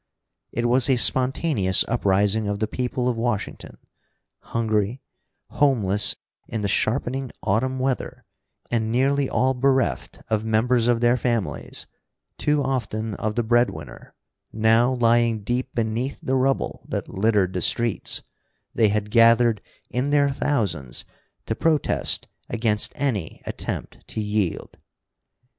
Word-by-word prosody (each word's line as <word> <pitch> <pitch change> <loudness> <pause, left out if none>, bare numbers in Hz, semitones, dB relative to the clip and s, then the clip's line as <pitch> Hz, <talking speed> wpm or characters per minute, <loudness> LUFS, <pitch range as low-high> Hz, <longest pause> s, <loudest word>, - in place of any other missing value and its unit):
It 120 - -2
was 125 +2 +2
a 130 - +5
spontaneous 125 - +3
uprising 105 -1 +1
of 100 0 -1
the 110 - 0
people 125 +2 -2
of 120 -2 0
Washington. 115 -3 -3 0.6
Hungry, 110 +1 -1 0.5
homeless 105 -8 +2 0.3
in 110 - -3
the 100 - 0
sharpening 130 +5 -1
autumn 130 +6 0
weather, 130 0 -2 0.5
and 110 -2 0
nearly 135 +3 +2
all 130 +1 +2
bereft 130 0 0
of 110 -1 0
members 115 +2 +2
of 120 -1 +2
their 120 +1 +4
families, 115 -5 -2 0.5
too 150 -1 +1
often 115 -5 -2
of 105 +1 -3
the 120 - +1
breadwinner, 110 - -1 0.4
now 115 +3 +3
lying 115 -3 +2
deep 120 +4 -2
beneath 115 +4 -1
the 130 - -3
rubble 135 +1 0
that - - -3
littered 100 -2 +1
the 90 - -2
streets, 115 +4 0 0.5
they 110 - +3
had 105 0 -1
gathered 115 -1 +5 0.3
in 125 +3 -1
their 145 -1 +3
thousands 100 - -2 0.4
to - - -1
protest 155 +5 +1 0.2
against 110 -2 0
any 125 - -2
attempt - - -5
to - - -5
yield. 105 -4 -2
115 Hz, 125 wpm, -23 LUFS, 105-130 Hz, 0.6 s, a